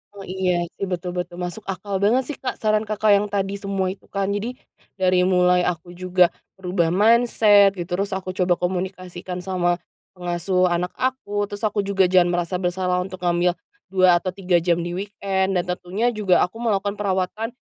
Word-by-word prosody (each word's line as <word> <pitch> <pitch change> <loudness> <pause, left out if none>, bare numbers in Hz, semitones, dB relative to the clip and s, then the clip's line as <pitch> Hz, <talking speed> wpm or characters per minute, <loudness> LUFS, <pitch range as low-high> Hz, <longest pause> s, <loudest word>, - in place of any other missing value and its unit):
Oh, 195 - -9
iya, 180 -2 0
sih. 195 - -3
Betul 180 0 -3
betul. 175 0 -4
Masuk 180 +4 -5
akal 195 +1 -3
banget 235 +6 +3
sih, - - -7
Kak, 260 - -3
saran 215 0 +1
Kakak 215 0 +2
yang 205 +1 +1
tadi 200 0 -2
semua 195 -2 -1
itu 195 - -13
kan. 200 0 -2
Jadi, 225 +5 -3 0.4
dari 185 -1 +2
mulai 180 -1 +3
aku 175 0 -4
juga 180 0 +2 0.3
merubah 180 -3 0
mindset 210 -2 +5
gitu, 175 -1 -6
terus 200 -1 -1
aku 185 -1 -4
coba 180 -2 +2
komunikasikan 180 0 -4
sama 175 -2 0 0.4
pengasuh 180 +1 0
anak 175 +1 0
aku, 205 -6 -1
terus 205 0 -8
aku 205 -1 -1
juga 195 -2 +3
jangan 180 -1 +4
merasa 175 +1 -1
bersalah 180 0 -1
untuk 185 0 -9
ngambil 175 0 +2 0.4
2 185 -2 +5
atau 185 +1 -3
3 185 -3 +1
jam 170 0 +1
di 175 +1 -4
weekend, 195 -1 -1
dan 175 - +1
tentunya 185 +6 -1
juga 210 -6 +2
aku 185 +6 -1
melakukan 205 -3 -1
perawatan 200 +3 -1
185 Hz, 180 wpm, -22 LUFS, 180-200 Hz, 0.4 s, mindset